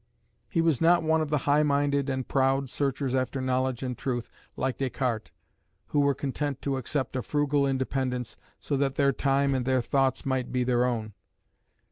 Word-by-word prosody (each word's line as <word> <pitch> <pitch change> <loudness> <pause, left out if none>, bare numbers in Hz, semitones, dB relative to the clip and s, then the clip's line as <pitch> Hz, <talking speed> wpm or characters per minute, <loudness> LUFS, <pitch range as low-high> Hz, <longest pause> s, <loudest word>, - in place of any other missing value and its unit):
He 165 - +1
was 165 -5 +2
not 170 +1 +5
one 160 0 +2
of 155 - -2
the 150 - +2
high 145 +1 +4
minded 140 -1 +1
and 130 -1 -2
proud 135 0 +1
searchers 135 -1 -1
after 130 +1 0
knowledge 130 0 0
and 125 -1 -3
truth, 120 -1 -3 0.3
like 130 -1 -1
Descartes, 125 -4 -2 0.6
who 145 - +1
were 140 -1 +3
content 140 0 -3
to 140 -1 0
accept 130 +1 -2
a 130 - 0
frugal 145 0 +1
independence 130 -2 -2 0.2
so 145 - -2
that 135 -1 0
their 140 -1 +3
time 140 +1 +1
and 130 -2 0
their 130 -1 +1
thoughts 135 +1 +1
might 130 -2 -1
be 125 -1 +1
their 125 0 +2
own. 110 -4 -2
135 Hz, 180 wpm, -27 LUFS, 130-140 Hz, 0.6 s, not